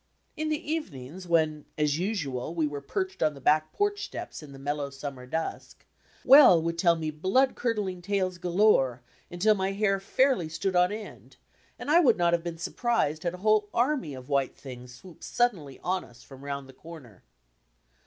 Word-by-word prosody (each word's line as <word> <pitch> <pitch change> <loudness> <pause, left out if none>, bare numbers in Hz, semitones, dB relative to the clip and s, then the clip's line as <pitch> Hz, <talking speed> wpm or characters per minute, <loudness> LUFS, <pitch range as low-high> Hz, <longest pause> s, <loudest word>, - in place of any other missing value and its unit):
In 310 0 -2
the 305 0 -3
evenings, 180 - -5
when, 155 -3 +1
as 150 0 +1
usual, 160 - -3
we 160 -2 +1
were 145 -1 -4
perched 380 - -4
on 155 -1 +2
the - - -11
back 155 +3 +2
porch 410 0 -1
steps - - -7
in 150 -2 -12
the 135 - -11
mellow 145 +1 -3
summer 135 -2 -8
dusk. 160 +4 -5 0.4
Well 260 - +8
would 170 +1 -3
tell 170 -1 +4
me 160 -1 -3
blood 190 - +2
curdling 210 -6 -2
tales 185 -1 -1
galore, 170 - +2 0.3
undl 205 +5 +3
my 190 0 -1
hair 195 -1 +1
fairly 240 - +1
stood 185 +4 -2
on 180 +1 +4
end, 215 0 -9 0.4
and 290 - -4
I 335 - +7
would 260 -10 +4
not 170 -1 +2
have 170 -1 +1
been 170 -1 -5
surprised 170 - -1
had 175 0 -2
a 185 +3 -12
whole 215 -1 +3
army 245 - 0
of 130 -1 -10
"white 140 -2 0
things" 125 -2 -10
swooped 160 +8 -14
suddenly 185 - -1
on 185 0 -1
us 120 +1 -17
from 135 0 -14
round 140 -1 -5
the 135 - -14
comer. 135 - -13
170 Hz, 185 wpm, -27 LUFS, 145-210 Hz, 0.4 s, Well